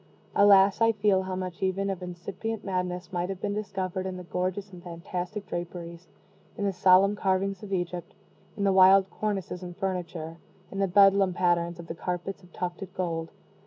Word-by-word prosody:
Alas, 200 0 +6
I 225 0 +5
feel 200 -2 +2
how 185 0 -4
much 185 -2 -5
even 190 +1 0
of 190 -1 -5
incipient 180 +5 -5
madness 180 -1 -3
might 175 +1 -1
have 195 -2 -4
been 205 +1 -2
discovered 190 -3 -3
in 185 -1 -5
the 180 - -7
gorgeous 185 +3 -3
and 175 - -10
fantastic 180 +3 -5
draperies, 175 -1 -6 0.5
in 205 - -1
the 195 - 0
solemn 190 +2 +5
carvings 195 -1 0
of 205 -2 -9
Egypt, 175 -2 -3 0.4
in 200 - -1
the 195 -1 +3
wild 190 +1 +6
cornices 195 -4 -3
and 175 -1 -8
furniture, 175 -4 -4 0.3
in 195 - -5
the 195 - +2
Bedlam 195 0 +5
patterns 175 -1 +1
of 170 - -9
the 165 - -5
carpets 180 +3 -4
of 180 -1 -19
tufted 180 +2 -5
gold! 165 -3 -2
185 Hz, 180 wpm, -27 LUFS, 175-195 Hz, 0.5 s, Alas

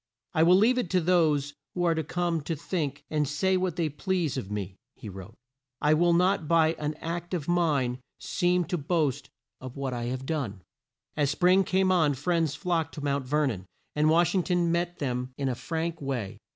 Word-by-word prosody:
"I 155 - +2
will 175 +3 +6
leave 235 +6 +4
it 215 - -2
to 185 - +3
those 155 -5 +2 0.2
who 175 - 0
are 170 -1 +3
to 160 0 -1
come 170 +1 -1
to 165 - -2
think 145 -3 -3
and 150 -2 +1
say 190 +7 +1
what 185 -3 0
they 170 -3 0
please 165 +1 -1
of 125 -8 -4
me," 100 -2 -4 0.2
he 105 - -9
wrote. 95 +3 -10 0.4
"I 150 - +3
will 170 +2 +3
not 180 -2 +2
by 165 -1 +4
an 150 0 -2
act 170 +3 -4
of 155 -5 -4
mine 145 -8 +1 0.2
seem 180 0 +1
to 180 -1 -2
boast 145 -3 -1 0.3
of 130 +1 -9
what 135 -2 -3
I 120 -1 -3
have 130 +2 -4
done." 125 - -3 0.5
As 145 -2 +1
spring 180 +6 +4
came 190 0 +2
on, 160 -6 +3
friends 160 +1 0
flocked 170 -5 -1
to 150 - -6
Mount 140 -2 -1
Ver 150 +2 +2
non, 95 -8 -3 0.3
and 150 +1 +3
Wash 170 +2 +3
ing 190 - +3
ton 175 -2 +1
met 175 +1 -1
them 125 -2 -3
in 140 - -1
a 130 - 0
frank 165 +5 -3
way. 130 -8 -4
155 Hz, 205 wpm, -27 LUFS, 140-175 Hz, 0.5 s, will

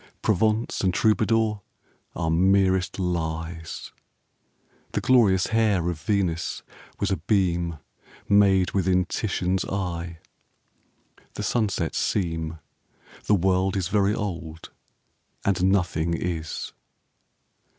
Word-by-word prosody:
Provence 110 +2 +1
and 95 - +2
Troubadour 110 -2 +2 0.5
are 80 -2 -1
merest 95 +1 +2
lies. 80 -2 -4 1.0
The - - +1
glorious 105 -8 +4
hair 105 -6 +2
of 80 - -7
Venice 95 -6 -1 0.4
was - - 0
a - - +1
beam 85 -3 0 0.5
Made 100 -2 +4
within 90 -1 +2
Titian's 95 -3 -1
eye. 85 -3 -4 1.2
The - - -4
sunsets 100 -8 0
seem, 80 -4 -1 0.7
The 105 - +4
world 95 +1 +1
is 90 -3 -1
very 105 0 +2
old 85 -7 -5 0.7
and 95 -2 +2
nothing 85 -3 +1
is. 80 -3 -4
95 Hz, 100 wpm, -25 LUFS, 85-100 Hz, 1.2 s, glorious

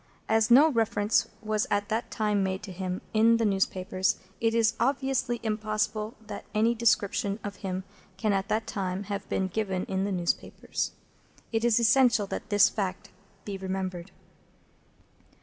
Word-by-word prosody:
As 220 +1 +3
no 285 +6 +7
reference 220 -3 +2 0.2
was 215 0 0
at 205 0 0
that 225 +2 -1
time 210 -2 0
made 190 0 -2
to 195 - -7
him 185 0 -4
in 225 +1 +5
the 230 - +1
newspapers, 190 -1 0 0.2
it 225 0 +1
is 225 -1 +3
obviously 265 -1 0
impossible 215 0 -1
that 210 -1 -7
any 225 +2 +3
description 215 -3 +1
of 205 -1 -6
him 190 -1 -4 0.3
can 205 +1 +1
at 195 0 0
that 220 +1 0
time 190 -1 -3
have 200 0 -5
been 190 - 0
given 190 -2 -2
in 190 0 -1
the 200 - -1
newspapers. 175 -2 -2 0.6
It 225 -1 0
is 240 -1 +4
essential 235 -2 +4
that - - -6
this 205 -1 +6
fact 190 -4 -3 0.4
be 195 -2 -5
remembered. 185 -1 -4
210 Hz, 155 wpm, -28 LUFS, 190-225 Hz, 0.6 s, no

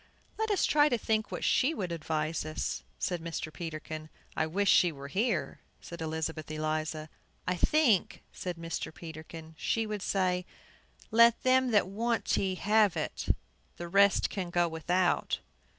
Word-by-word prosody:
"Let 440 0 -1
us 405 -4 +2
try 295 0 +4
to 245 - +1
think 220 -1 -1
what - - -4
she 290 +5 +3
would 185 -4 -3
advise 155 -1 -2
us," 155 0 -3 0.2
said 175 - -2
Mr. 160 -1 -5
Peterkin. 155 -2 -6 0.3
"I 155 - +1
wish 200 +5 0
she 175 -2 +5
were 140 -2 -9
here," 195 - -1 0.2
said 170 -1 -9
Elizabeth 160 -1 -3
Eliza. 155 0 -2 0.4
"I 180 - +2
think," 235 - +2
said 180 -2 -5
Mr. 165 -1 -4
Peterkin, 160 0 -9
"she 225 -1 0
would 210 -2 -4
say, 185 -2 0 0.6
let 235 +1 +6
them 260 0 +4
that 210 -5 +3
want 230 +4 -1
tea 190 -1 +1
have 210 0 +3
it; - - -3 0.5
the 175 - -5
rest 200 +2 +4
can 185 -4 -3
go 175 0 +2
without." 175 +3 +1
175 Hz, 155 wpm, -30 LUFS, 160-215 Hz, 0.6 s, let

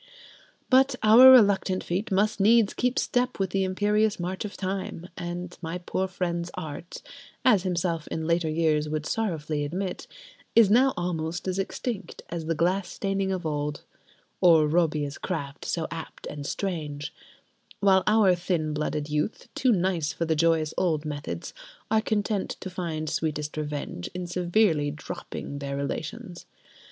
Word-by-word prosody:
But 265 0 +4
our 230 +5 +9
reluctant 200 -6 +5
feet 195 +6 -2
must 205 +3 +2
needs 220 +1 +5
keep 250 +1 0
step 250 0 0
with 190 -2 -1
the 195 0 +1
imperious 210 +3 +1
march 180 +2 -3
of 205 - -7
Time, 190 -2 -4
and 175 +1 -5
my 165 +1 -4
poor 185 +1 -2
friend's 175 -2 -3
Art 155 +3 -7 0.4
(as 215 -7 +5
himself 175 -3 -1
in 160 - -3
later 170 0 +1
years 155 -1 +1
would 155 0 -2
sorrowfully 160 -9 -2
admit) 180 +5 -4 0.5
is 225 -4 +6
now 260 +4 +5
almost 175 0 -3
as 185 +1 -1
extinct 205 +2 -4
as 165 -2 -4
the 165 - 0
glass 180 +4 +1
staining 195 -1 -1
of 185 -3 -3
old, 150 -1 -2 0.6
or 165 -4 +6
"Robbia's 150 -3 0
craft 145 -6 -4
so 165 -2 -1
apt 165 -1 -8
and 145 -1 -6
strange"; 150 -7 -4 0.7
while 190 -1 +5
our 210 -3 +5
thin 170 -3 -1
blooded 150 0 -2
youth, 150 +7 -2
too 255 - +2
nice 180 -6 +1
for 165 - -2
the 160 -1 +1
joyous 160 -1 +2
old 160 -4 0
methods, 145 - -5 0.4
are 220 0 +4
content 210 -2 -1
to 190 - -7
find 165 -4 -3
sweetest 150 -1 -2
revenge 145 - -4
in 180 0 -3
severely 175 -3 +2
dropping 145 -1 -7
their 140 -1 -4
relations. 160 +5 -5
175 Hz, 150 wpm, -26 LUFS, 155-195 Hz, 0.7 s, our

